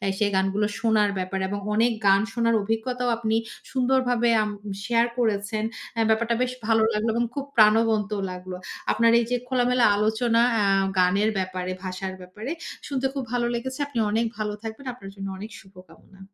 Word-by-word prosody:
অ্যা 195 Hz, -, -1 dB
সেই 210 Hz, -2 st, +2 dB
গানগুলো 195 Hz, +2 st, +1 dB
শোনার 220 Hz, -2 st, +3 dB
ব্যাপারে 190 Hz, +1 st, -2 dB
এবং 205 Hz, +1 st, -3 dB
অনেক 235 Hz, +2 st, +3 dB
গান 195 Hz, 0 st, +6 dB
শোনার 230 Hz, 0 st, +1 dB
অভিজ্ঞতাও 245 Hz, +4 st, -1 dB
আপনি 225 Hz, -1 st, 0 dB, 0.3 s
সুন্দরভাবে 250 Hz, -2 st, +2 dB
আম 210 Hz, -, -2 dB, 0.3 s
শেয়ার 235 Hz, +1 st, +3 dB
করেছেন। 215 Hz, -1 st, 0 dB, 0.3 s
অ্যা 225 Hz, -1 st, +1 dB
ব্যাপারটা 230 Hz, +1 st, +2 dB
বেশ 250 Hz, 0 st, 0 dB
ভালো 225 Hz, -1 st, +3 dB
লাগলো 210 Hz, +2 st, 0 dB
এবং 240 Hz, +1 st, +1 dB
খুব 280 Hz, -, -3 dB
প্রাণবন্তও 215 Hz, -1 st, +4 dB
লাগলো। 180 Hz, 0 st, -7 dB, 0.4 s
আপনার 230 Hz, 0 st, +4 dB
এই 235 Hz, -, 0 dB
যে 250 Hz, -, +2 dB
খোলামেলা 250 Hz, -1 st, +2 dB
আলোচনা 225 Hz, +2 st, +2 dB
অ্যা 215 Hz, -2 st, +2 dB, 0.3 s
গানের 200 Hz, +4 st, +3 dB
ব্যাপারে, 185 Hz, -1 st, -3 dB
ভাষার 185 Hz, +1 st, -4 dB
ব্যাপারে, 205 Hz, +8 st, -8 dB, 0.4 s
শুনতে 270 Hz, -2 st, -1 dB
খুব 270 Hz, -3 st, -3 dB
ভালো 240 Hz, -1 st, +1 dB
লেগেছে। 260 Hz, +2 st, -4 dB
আপনি 280 Hz, -4 st, -5 dB
অনেক 225 Hz, +2 st, +1 dB
ভালো 210 Hz, -1 st, -2 dB
থাকবেন। 225 Hz, +5 st, -7 dB
আপনার 195 Hz, -6 st, -10 dB
জন্য 195 Hz, -1 st, -6 dB
অনেক 210 Hz, +3 st, -7 dB
শুভকামনা। 185 Hz, 0 st, -18 dB
220 Hz, 170 wpm, -25 LUFS, 200-235 Hz, 0.4 s, গান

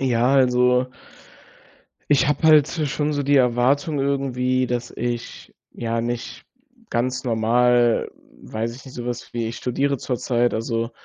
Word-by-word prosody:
Ja, 125 Hz, 0 st, +2 dB
also 125 Hz, -1 st, +3 dB, 1.2 s
ich 140 Hz, -1 st, +3 dB
habe 150 Hz, +2 st, -1 dB
halt 150 Hz, -2 st, +6 dB
so 155 Hz, -3 st, -2 dB
schon 150 Hz, +2 st, -1 dB
so 145 Hz, -, -1 dB
die 145 Hz, +1 st, +3 dB
Erwartung 130 Hz, +4 st, +2 dB
irgendwie, 130 Hz, -2 st, 0 dB
dass 120 Hz, 0 st, -3 dB
ich, 120 Hz, -1 st, -5 dB, 0.2 s
ja, 115 Hz, -1 st, -2 dB
nicht 120 Hz, 0 st, -5 dB, 0.4 s
ganz 130 Hz, +2 st, -2 dB
normal 120 Hz, +1 st, +2 dB, 0.3 s
weiß 115 Hz, +2 st, -4 dB
ich 135 Hz, -, -14 dB
nicht, 130 Hz, -, -12 dB
sowas 120 Hz, 0 st, -6 dB
wie 115 Hz, -1 st, -2 dB
ich 115 Hz, -, -6 dB
studiere 140 Hz, +3 st, -1 dB
zurzeit. 120 Hz, -1 st, -1 dB
Also, 115 Hz, +1 st, -2 dB
125 Hz, 140 wpm, -22 LUFS, 120-135 Hz, 1.2 s, halt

